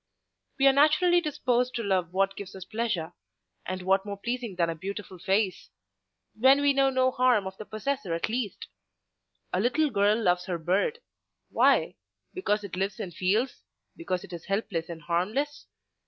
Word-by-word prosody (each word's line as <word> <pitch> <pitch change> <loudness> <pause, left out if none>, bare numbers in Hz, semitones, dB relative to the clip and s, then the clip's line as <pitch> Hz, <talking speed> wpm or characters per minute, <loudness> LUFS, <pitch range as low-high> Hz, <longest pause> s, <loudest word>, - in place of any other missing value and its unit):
We 275 - +3
are 270 - +7
naturally 310 +5 +4
disposed 255 -5 0
to 230 - -2
love 185 -4 0
what 195 +1 +1
gives 195 -1 -8
us 190 -1 -8
pleasure, 215 -7 -2 0.5
and 185 0 -4
what 190 +1 +3
more 200 0 -6
pleasing 235 -1 -4
than 170 -1 +1
a 165 - -1
beautiful 190 +2 -7
face—when 215 +6 0
we 285 -1 +4
know 275 0 +3
no 260 -1 +2
harm 250 -5 +3
of 190 0 -6
the 215 - -8
possessor 215 -4 -2
at 165 - -1
least? 220 -3 -3 0.9
A 180 - +1
little 275 +7 +2
girl 205 +1 +3
loves 180 -4 +1
her 180 -2 -1
bird—Why? 190 - 0 0.4
Because 215 - 0
it 195 -3 -6
lives 195 +2 -2
and 175 - -5
feels; 210 +10 0 0.3
because 185 - -3
it 175 - -11
is 170 -1 -8
helpless 195 -5 -2
and 165 -2 -8
harmless? 210 - -1
205 Hz, 165 wpm, -27 LUFS, 185-255 Hz, 0.9 s, are